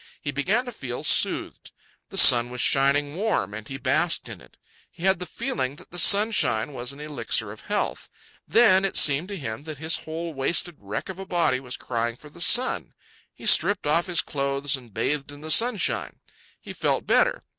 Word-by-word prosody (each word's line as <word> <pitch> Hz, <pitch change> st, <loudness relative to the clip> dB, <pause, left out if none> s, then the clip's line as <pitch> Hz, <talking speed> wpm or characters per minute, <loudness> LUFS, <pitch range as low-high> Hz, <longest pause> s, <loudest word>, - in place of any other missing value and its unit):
He 145 Hz, -, -4 dB
began 190 Hz, -, 0 dB
to 245 Hz, -, -6 dB
feel 125 Hz, -, -6 dB
soothed. -, -, +1 dB, 0.4 s
The -, -, -8 dB
sun 120 Hz, -1 st, +7 dB
was 125 Hz, 0 st, -7 dB
shining 145 Hz, +3 st, +2 dB
warm, 195 Hz, -, -1 dB
and 110 Hz, 0 st, -8 dB
he 135 Hz, -, -6 dB
basked 145 Hz, +2 st, 0 dB
in 100 Hz, -7 st, -10 dB
it. -, -, -20 dB, 0.3 s
He 170 Hz, -, -13 dB
had 190 Hz, -1 st, +2 dB
the 180 Hz, -, -6 dB
feeling 145 Hz, -, -3 dB
that -, -, -16 dB
the 175 Hz, -, -6 dB
sun 205 Hz, +6 st, +5 dB
shine 140 Hz, -, 0 dB
was 125 Hz, -1 st, -4 dB
an 140 Hz, -, -11 dB
elixir 120 Hz, -7 st, -2 dB
of 110 Hz, -, -12 dB
health. 205 Hz, 0 st, -3 dB, 0.4 s
Then 195 Hz, -5 st, +4 dB
it 195 Hz, -, -1 dB
seemed 145 Hz, +4 st, +4 dB
to 200 Hz, -1 st, -6 dB
him 110 Hz, -6 st, -6 dB
that 155 Hz, -2 st, -7 dB
his 160 Hz, +3 st, 0 dB
whole 165 Hz, +1 st, -6 dB
wasted 155 Hz, +4 st, 0 dB
wreck 100 Hz, +1 st, -5 dB
of 190 Hz, 0 st, -7 dB
a 195 Hz, -, -6 dB
body 170 Hz, -8 st, +1 dB
was 125 Hz, -1 st, -7 dB
crying 115 Hz, -1 st, -3 dB
for 150 Hz, +4 st, -15 dB
the 170 Hz, -, -11 dB
sun. 250 Hz, +7 st, +2 dB, 0.4 s
He -, -, -14 dB
stripped 205 Hz, -5 st, +3 dB
off 165 Hz, +5 st, +1 dB
his 175 Hz, -2 st, +1 dB
clothes 140 Hz, 0 st, -1 dB
and 125 Hz, -4 st, -12 dB
bathed 140 Hz, +7 st, -2 dB
in 145 Hz, 0 st, -13 dB
the 155 Hz, +1 st, -5 dB
sunshine. 225 Hz, +4 st, +1 dB, 0.4 s
He -, -, -10 dB
felt -, -, -1 dB
better. -, -, +2 dB
145 Hz, 200 wpm, -24 LUFS, 130-180 Hz, 0.4 s, sun